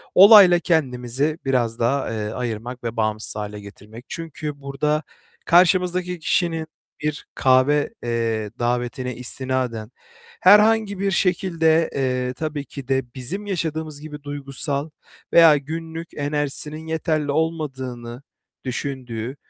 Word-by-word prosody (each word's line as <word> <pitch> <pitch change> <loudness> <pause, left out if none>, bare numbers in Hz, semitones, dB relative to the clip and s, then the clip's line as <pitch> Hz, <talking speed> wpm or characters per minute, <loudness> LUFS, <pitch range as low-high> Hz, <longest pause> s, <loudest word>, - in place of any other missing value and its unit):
Olayla 195 -3 +9
kendimizi 140 -1 0
biraz 120 -4 0
daha, 130 +2 0
eee, 105 -1 -3
ayırmak 120 +1 -5
ve 115 0 -4
bağımsız 110 -1 -1
hâle 105 -1 -5
getirmek. 105 +4 -12
Çünkü 150 -3 -6
burada 150 +3 -1 0.4
karşımızdaki 180 0 +3
kişinin 165 -1 0 0.3
bir 150 0 -3
kahve, 135 - +3
eee, 115 -3 -1
davetine 125 +1 -2
istinaden, 125 -3 -3 0.5
herhangi 210 0 +5
bir 200 0 0
şekilde, 165 -3 +2
eee, 125 -2 -1
tabii 150 +1 -4
ki 140 -3 -9
de 135 -1 0
bizim 175 +12 -4
yaşadığımız 160 -5 -3
gibi 150 -1 -9
duygusal 145 +1 -3 0.4
veya 165 -3 +8
günlük 160 +3 -6
enerjisinin 150 +2 -2
yeterli 155 -2 -1
olmadığını 130 -6 -3 0.4
düşündüğü 125 -2 -4
145 Hz, 110 wpm, -22 LUFS, 125-160 Hz, 0.5 s, Olayla